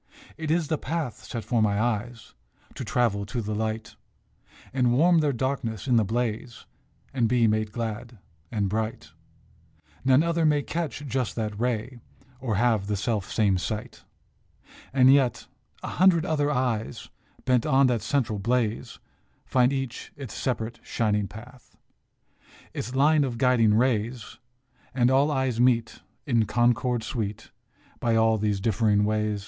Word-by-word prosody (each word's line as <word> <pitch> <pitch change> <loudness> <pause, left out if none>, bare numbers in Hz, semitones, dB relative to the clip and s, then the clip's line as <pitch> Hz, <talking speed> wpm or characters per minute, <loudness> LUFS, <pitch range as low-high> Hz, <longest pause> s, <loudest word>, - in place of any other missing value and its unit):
It 160 -1 -5
is 165 -1 +1
the 155 - -1
path 160 -7 -4
set 115 -2 -5
for 120 -3 0
my 105 -1 +2
eyes 115 0 -3 0.4
To - - -6
travel 110 -5 0
to 120 - -3
the 105 -1 -3
light, 110 -6 -3 0.8
And 125 -2 +2
warm 170 +6 +4
their 150 -2 +2
darkness 130 -3 -3
in 125 -2 +4
the 110 - +4
blaze, 115 +2 -3 0.5
And 120 -4 +1
be 120 -1 +3
made 110 -1 +1
glad 115 +1 -5 0.3
and 105 -3 0
bright. 110 -6 -3 0.9
None 130 +3 +4
other 170 0 0
may 150 -2 +3
catch 155 -2 -4
just 130 -2 -2
that 105 -2 -3
ray, 120 +1 -2 0.4
Or 120 -5 -2
have 110 -2 +1
the 105 - 0
self 105 -1 -2
same 100 -4 +2
sight. 110 +6 -5 0.9
And 130 0 +6
yet, 135 -4 +2 0.4
a - - -4
hundred 180 -3 +3
other 150 -4 0
eyes, 125 -5 -2 0.4
Bent 125 -2 +2
on 135 +1 +4
that 120 -4 +1
central 110 -2 -1
blaze, 115 +1 -1 0.5
Find 125 0 +3
each 135 -3 -4
its 135 -8 -8
separate, 115 -2 -3
shining 105 -3 -1
path, 120 +4 -14 1.0
Its 125 +4 -5
line 150 +2 +4
of 125 -4 -3
guiding 115 -4 +3
rays; 115 -1 -1 0.6
And 125 -1 +3
all 140 +3 +4
eyes 130 -5 -1
meet 120 -2 +2 0.2
in 115 -5 +2
concord 120 0 +1
sweet 110 -2 -4 0.5
By 115 -3 +1
all 110 -1 +3
these 105 -1 0
differing 105 0 +2
ways. 105 -1 0
120 Hz, 150 wpm, -26 LUFS, 110-130 Hz, 1.0 s, And